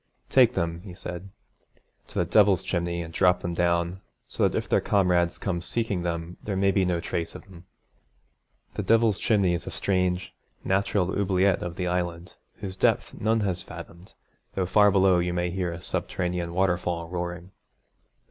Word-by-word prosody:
'Take - - +5
them,' 85 0 -2
he 90 -2 -10
said, 90 0 -7 0.8
'to - - -10
the 85 - +2
Devil's 100 +1 +4
Chimney 85 -1 -2
and 80 0 -10
drop 90 +1 +3
them 85 - -3
down, 85 +1 0 0.3
so - - +1
that - - -2
if - - -2
their - - +2
comrades 90 -3 +2
come 85 -4 -2
seeking 105 -1 -1
them 85 0 -4
there 100 - -3
may 100 +1 +3
be 95 -1 +2
no 90 -2 0
trace 85 0 -3
of - - -9
them.' 90 -3 -15 1.1
The - - -3
Devil's 115 -2 +3
Chimney 100 -5 +2
is 85 - -3
a - - -2
strange, 90 -1 -1 0.3
natural 95 -1 +1
oubliette 95 -1 +2
of 85 -1 -4
the 90 - -2
Island, 90 0 -2 0.2
whose 95 -4 -6
depth - - +1
none 110 +1 +1
has 95 -4 -1
fathomed, 85 +3 -11 0.4
though 95 - 0
far 105 +3 +5
below 95 -2 +4
you 90 0 -1
may 90 0 0
hear 90 -1 -2
a 85 0 -8
subterranean 90 -2 -2
waterfall 90 -2 0
roaring. 90 +1 -5
90 Hz, 175 wpm, -26 LUFS, 85-95 Hz, 1.1 s, Take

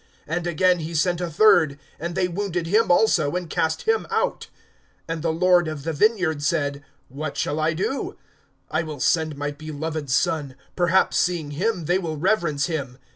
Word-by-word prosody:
(12)And 175 +2 -2
again 180 +2 +3
he 165 +1 -5
sent 175 +3 +1
a 175 - -2
third; 160 -4 +4 0.2
and 170 +2 -4
they 190 -1 +1
wounded 180 -1 -2
him 210 +7 +2
also, 175 -5 +3
and 180 -2 -4
cast 160 0 0
him 450 0 +1
out. 460 +2 -1 0.6
(13)And 165 -1 -3
the 165 0 0
lord 175 +1 +3
of 155 -3 -5
the 165 +1 -2
vineyard 175 -4 +2
said: 145 -2 -1 0.2
What 145 +3 -6
shall 150 - -1
I 155 +1 +1
do? 195 - -3 0.5
I 160 - +1
will 155 -3 -6
send 160 +1 +1
my 145 0 -2
beloved 155 0 -5
son; 145 -1 0 0.2
perhaps, 180 +1 +2
seeing 170 -5 0
him, 180 +3 -1
they 180 +4 +2
will 160 -4 -4
reverence 165 -4 +1
him. 140 -7 -4
165 Hz, 180 wpm, -23 LUFS, 150-180 Hz, 0.6 s, third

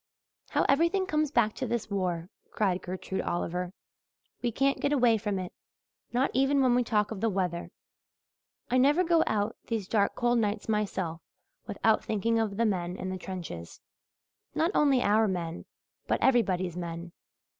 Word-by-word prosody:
"How - - +1
everything 335 +7 +3
comes 305 -4 0
back 235 -6 +2
to 260 - -4
this 230 -2 -2
war," 180 -2 -2 0.2
cried 190 -4 0
Gertrude 185 +1 -4
Oliver. 175 +1 -2 0.7
"We 240 - 0
can't 275 +4 +1
get 285 - 0
away 240 -6 +4
from 205 -2 -2
it 185 -1 -5 0.6
not 250 +3 +1
even 270 +2 +3
when 250 -2 +4
we 245 0 +3
talk 210 -3 +1
of 210 -3 -5
the 225 - +2
weather. 180 -3 -2 1.0
I 255 - +4
never 290 +7 +4
go 335 -2 +4
out 210 +1 0
these 220 -5 -2
dark 200 -1 +1
cold 240 0 +2
nights 210 -1 -1
myself 190 -6 -1 0.5
without - - +2
thinking 225 +2 0
of 210 -3 -1
the 230 - +2
men 180 -4 -1
in 185 - -4
the 185 - -3
trenches 165 - -7 0.8
not 330 +3 +2
only 275 -4 +3
our 215 +2 +4
men 170 -3 -3 0.4
but - - +1
everybody's 185 -9 +2
men. 170 -1 -5
215 Hz, 165 wpm, -29 LUFS, 185-250 Hz, 1.0 s, away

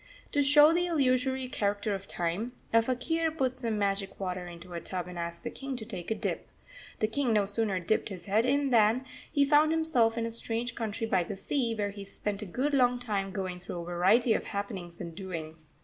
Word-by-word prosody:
To 290 - +3
show 295 +3 +7
the 350 +1 +2
illusory 260 -4 +1
character 205 -3 -1
of 195 0 -5
time, 185 +9 -2 0.2
a 230 - +7
faquir 320 +8 0
put 260 -5 -1
some 230 -4 -1
magic 195 -1 -1
water 180 -2 -3
into 175 +1 -10
a 170 - -4
tub 180 0 -3
and 180 -1 -7
asked 170 0 -4
the - - -4
King 270 -1 -5
to 220 - -6
take 190 -6 -6
a 220 - +1
dip. - - -3 0.5
The 215 - +3
King 245 +1 +1
no 210 -2 +3
sooner 205 -1 0
dipped 180 +6 0
his 190 -3 -7
head 210 +2 +3
in 275 +2 +2
than 230 +2 +4 0.3
he 285 -2 +4
found 300 +2 +5
himself 300 -9 +2
in 230 - 0
a 230 - -3
strange 230 +1 -2
country 225 -1 -3
by 185 -5 +2
the 195 - -5
sea, 235 +3 -1
where 205 -2 -1
he 200 0 -8
spent 200 +1 -4
a 210 - -5
good 265 +10 -1
long 250 -2 +4
time 205 -5 -2
going 185 -2 -4
through 180 0 -7
a - - -7
variety 190 +7 +3
of - - -1
happenings 190 -4 -5
and 170 - -6
doings. 160 -4 -7
220 Hz, 220 wpm, -30 LUFS, 190-255 Hz, 0.5 s, show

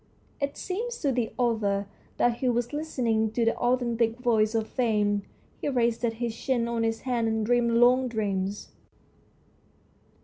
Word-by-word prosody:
It 280 0 -2
seemed 415 +6 -3
to 280 - +2
the 245 -3 -1
author 215 -5 +1 0.3
that 240 -1 +2
he 255 -1 0
was 240 +2 -1
listening 240 -8 0
to 235 -1 +1
the 230 - +2
authentic 240 -2 +1
voice 225 -3 +2
of 220 -1 0
fame. 210 -4 +1 0.4
He - - -1
rested 235 -2 +1
his 230 0 -3
chin 240 -2 0
on 235 -1 -1
his 225 0 -1
hand 240 -3 0
and 220 -1 0
dreamed 240 0 +2
long 250 +2 +5
dreams. 205 -3 -2
235 Hz, 150 wpm, -27 LUFS, 220-250 Hz, 0.4 s, long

